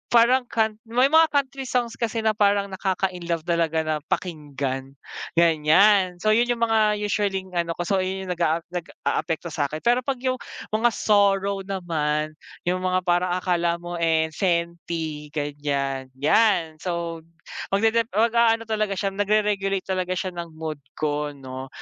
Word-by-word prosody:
parang 245 Hz, +2 st, +5 dB
kant 220 Hz, -2 st, 0 dB
may 250 Hz, +4 st, +3 dB
mga 320 Hz, +1 st, +7 dB
country 275 Hz, -1 st, -1 dB
songs 240 Hz, -2 st, -1 dB
kasi 230 Hz, -1 st, -1 dB
na 220 Hz, -, +4 dB
parang 200 Hz, -1 st, +2 dB
nakaka-inlove 180 Hz, -3 st, -2 dB
talaga 165 Hz, -1 st, +1 dB
na 155 Hz, 0 st, 0 dB
pakinggan, 140 Hz, -5 st, -3 dB, 0.4 s
ganyan. 170 Hz, +4 st, +4 dB
So 215 Hz, -, +4 dB
yun 235 Hz, +3 st, +3 dB
yung 240 Hz, -1 st, -1 dB
mga 220 Hz, -2 st, +3 dB
usually-ing 195 Hz, -2 st, -1 dB
ano 170 Hz, -1 st, -1 dB
ko, 175 Hz, -, -3 dB
so 195 Hz, +3 st, +1 dB
ayun 190 Hz, +1 st, -2 dB
yung 185 Hz, -, -4 dB
nag-aap 165 Hz, -1 st, 0 dB
nag-aapekto 170 Hz, -1 st, -3 dB
sakin 150 Hz, +1 st, -2 dB
pero 240 Hz, +1 st, +4 dB
pag 275 Hz, -1 st, 0 dB
yung 255 Hz, 0 st, 0 dB, 0.3 s
mga 220 Hz, +2 st, +3 dB
sorrow 200 Hz, -1 st, +2 dB
naman 155 Hz, -5 st, -1 dB, 0.3 s
yung 180 Hz, +1 st, 0 dB
mga 185 Hz, 0 st, +2 dB
parang 175 Hz, 0 st, +1 dB
akala 175 Hz, -2 st, +1 dB
mo, 175 Hz, 0 st, -5 dB
eh, 160 Hz, -1 st, +2 dB
senty, 170 Hz, -3 st, -2 dB
ganyan. 140 Hz, -2 st, -2 dB
Yan, 165 Hz, +2 st, +2 dB
so 170 Hz, -2 st, -3 dB, 0.5 s
mag 200 Hz, -, +2 dB
dep 230 Hz, +1 st, +3 dB
mag-aano 230 Hz, +1 st, +3 dB
talaga 215 Hz, -2 st, -1 dB
siya 195 Hz, -1 st, -1 dB
nagreregulate 200 Hz, -1 st, +1 dB
talaga 185 Hz, -1 st, -1 dB
siya 185 Hz, 0 st, -2 dB
ng 170 Hz, -2 st, -7 dB
mood 155 Hz, -2 st, -5 dB, 0.2 s
ko, 150 Hz, -1 st, -2 dB
no? 130 Hz, -1 st, -8 dB
185 Hz, 150 wpm, -24 LUFS, 160-210 Hz, 0.5 s, mga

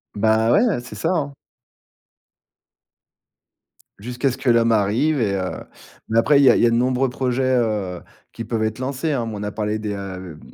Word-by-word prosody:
Bah 110 Hz, +2 st, +2 dB
ouais, 220 Hz, -, +3 dB
c'est 125 Hz, -, -11 dB
ça, 165 Hz, -, -2 dB
hein. 150 Hz, -6 st, -1 dB, 2.7 s
Jusqu'à 125 Hz, +4 st, -2 dB
ce 130 Hz, -, -7 dB
que 135 Hz, -, -1 dB
l'homme 115 Hz, -1 st, +4 dB
arrive 115 Hz, +8 st, +1 dB
et 100 Hz, -3 st, 0 dB
heu, 95 Hz, -1 st, -2 dB, 0.6 s
mais 115 Hz, -, 0 dB
après, 140 Hz, +5 st, +4 dB
il -, -, +5 dB
y 135 Hz, -, +7 dB
a -, -, +6 dB
il -, -, +2 dB
y -, -, +7 dB
a 115 Hz, -, +3 dB
de -, -, +2 dB
nombreux 125 Hz, +2 st, +1 dB
projets, 125 Hz, +1 st, -1 dB
heu, 105 Hz, -7 st, -1 dB, 0.3 s
qui 115 Hz, -, -7 dB
peuvent 115 Hz, -1 st, -2 dB
être 110 Hz, +1 st, -2 dB
lancés, 140 Hz, +4 st, -2 dB
hein. 120 Hz, -5 st, -2 dB
On 105 Hz, -1 st, -6 dB
a 105 Hz, -, -3 dB
parlé 105 Hz, 0 st, -2 dB
des, 105 Hz, -1 st, -4 dB
heu, 95 Hz, -5 st, -7 dB
115 Hz, 195 wpm, -21 LUFS, 105-130 Hz, 2.7 s, y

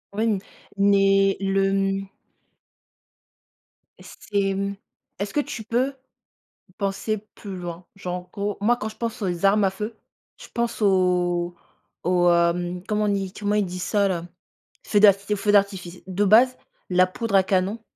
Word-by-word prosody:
Oui 215 Hz, -, 0 dB
m 220 Hz, -3 st, +2 dB, 0.4 s
mais 195 Hz, 0 st, +4 dB
le, 195 Hz, 0 st, +1 dB
mmh 195 Hz, 0 st, 0 dB, 1.9 s
C'est, 200 Hz, -2 st, -2 dB
mmh, 200 Hz, +1 st, -2 dB, 0.4 s
est-ce 200 Hz, 0 st, -3 dB
que 295 Hz, -, +1 dB
tu 225 Hz, -5 st, -4 dB
peux 250 Hz, +5 st, 0 dB, 0.8 s
penser 200 Hz, +2 st, -2 dB, 0.2 s
plus 195 Hz, -3 st, -8 dB
loin? 175 Hz, 0 st, -7 dB
Genre, 180 Hz, -3 st, -4 dB
en 180 Hz, 0 st, -7 dB
gros, 205 Hz, -1 st, -3 dB
moi 235 Hz, +4 st, +3 dB
quand 220 Hz, -2 st, -4 dB
je 215 Hz, -, -11 dB
pense 230 Hz, -2 st, -4 dB
aux 180 Hz, -2 st, -2 dB
armes 205 Hz, +1 st, +4 dB
à 190 Hz, -, +3 dB
feu, 210 Hz, +4 st, -6 dB, 0.4 s
je -, -, -12 dB
pense 235 Hz, 0 st, -2 dB
aux 180 Hz, -3 st, +2 dB, 0.5 s
aux, 175 Hz, 0 st, +3 dB
hem, 175 Hz, +1 st, +1 dB
comment 210 Hz, -1 st, 0 dB
on -, -, +1 dB
dit? 195 Hz, -2 st, -1 dB
Comment 205 Hz, 0 st, -2 dB
ils 210 Hz, -, +2 dB
disent 180 Hz, 0 st, -6 dB
ça 200 Hz, +1 st, +1 dB
là? 175 Hz, -2 st, -3 dB, 0.6 s
Feux 205 Hz, -, +3 dB
d'arf 200 Hz, -2 st, +7 dB, 0.2 s
feux 205 Hz, +1 st, +1 dB
d'artifice. 190 Hz, -3 st, +1 dB
De 190 Hz, +2 st, 0 dB
base, 240 Hz, +6 st, +5 dB, 0.3 s
la 185 Hz, 0 st, +5 dB
poudre 200 Hz, +2 st, -1 dB
à 190 Hz, -, +6 dB
canon 190 Hz, +3 st, 0 dB
195 Hz, 160 wpm, -24 LUFS, 185-210 Hz, 1.9 s, d'arf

